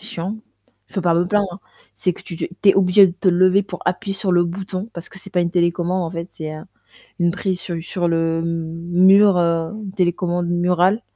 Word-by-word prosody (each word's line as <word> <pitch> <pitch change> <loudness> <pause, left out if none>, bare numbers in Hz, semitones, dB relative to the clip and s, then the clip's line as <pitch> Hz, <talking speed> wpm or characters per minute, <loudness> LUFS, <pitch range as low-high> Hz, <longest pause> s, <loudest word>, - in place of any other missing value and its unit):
chiant, 210 -1 -5 0.5
je - - -21
peux 190 - -1
pas 170 -2 +2
me 175 +1 +2
plaindre, 200 -2 -1 0.4
c'est 185 -4 0
que - - -14
tu 170 - -8
te - - -3
tu 180 +3 -1
es - - 0
obligé 195 +1 +6
de 175 - -3
te 185 +1 -1
lever 185 +3 +4
pour 180 -2 -8
appuyer 195 +1 -2
sur 190 -1 -1
le 175 0 +4
bouton 190 +3 -5
parce 170 +1 -7
que 195 - -12
c'est 195 - -10
pas 180 - +1
une 170 - 0
télécommande 175 +1 0
en 165 - -4
fait, 170 +1 -6
c'est 155 -2 -7
un 155 +5 -9 0.5
une 175 0 +3
prise 185 0 -2
sur 170 -3 -5
sur 175 +1 -2
le 165 0 0
mur, 175 +4 +3
heu, 165 -1 0
une 190 - -7
télécommande 175 -2 -1
murale, 180 +5 +2
180 Hz, 220 wpm, -20 LUFS, 170-190 Hz, 0.5 s, obligé